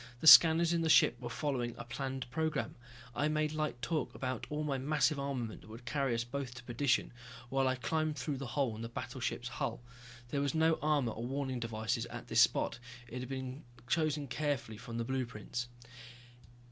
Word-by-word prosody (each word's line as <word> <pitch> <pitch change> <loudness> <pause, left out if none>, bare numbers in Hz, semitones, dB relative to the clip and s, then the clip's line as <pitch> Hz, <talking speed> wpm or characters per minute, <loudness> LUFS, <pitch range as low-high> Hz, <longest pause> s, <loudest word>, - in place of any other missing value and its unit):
The - - -5
scanners 165 +1 +9
in 170 - +1
the 165 - +1
ship 125 - +6
were 120 - -4
following 125 -3 -2
a 120 - -6
planned 130 +1 -4
program. 160 +3 -1 0.4
I 145 - +1
made 155 0 0
light 155 -5 -2
talk 160 -2 -1
about 130 -1 -3
all 150 +1 -2
my 140 -3 -1
massive 145 +1 +2
armament 130 -5 -3
that - - -15
would 115 +2 -10
carry 135 -1 0
us 115 - 0
both 125 0 -5
to 125 - -9
perdition, 125 +2 +1 0.4
while 135 +1 +2
I 130 - +2
climbed 155 +4 -1
through 145 -3 -2
the 135 0 -5
hole 125 -2 0
in 110 - -7
the 115 - -5
battleship's 120 0 -4
hull. 120 -1 -3 0.5
There 140 +1 0
was 140 +2 0
no 160 0 +3
armor 150 -6 +2
or 115 +2 -5
warning 135 -1 -2
devices 115 0 -2
at - - -8
this - - +5
spot, 115 - +2 0.3
it 125 - -5
had 125 0 -6
been 130 +2 -5 0.2
chosen 155 -1 +1
carefully 135 -5 -2
from 115 -1 -6
the 115 - -1
blueprints. 125 -2 -3
130 Hz, 195 wpm, -33 LUFS, 120-150 Hz, 0.5 s, scanners